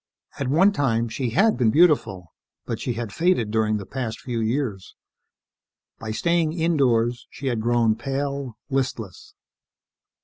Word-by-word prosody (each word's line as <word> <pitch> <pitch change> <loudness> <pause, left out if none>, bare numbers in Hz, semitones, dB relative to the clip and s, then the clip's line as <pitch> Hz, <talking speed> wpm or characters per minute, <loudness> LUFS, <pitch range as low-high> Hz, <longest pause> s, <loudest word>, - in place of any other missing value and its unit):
At 140 - -1
one 170 +9 +4
time, 120 - 0
she 120 +2 -2
had 205 - +3
been 120 -4 +3
beautiful, 125 - +2 0.3
but - - -4
she 125 - -2
had 115 -3 -5
faded 165 - +1
during 110 -1 +1
the 100 - -7
past 115 +1 -4
few 120 -2 -4
years. 110 -4 -2 1.0
By 110 - -6
staying 165 +7 +1
indoors, 125 -8 +1
she 140 - -10
had 120 -4 0
grown 120 -1 +2
pale, 140 -2 -4
listless. 125 - -4
120 Hz, 140 wpm, -23 LUFS, 110-145 Hz, 1.0 s, one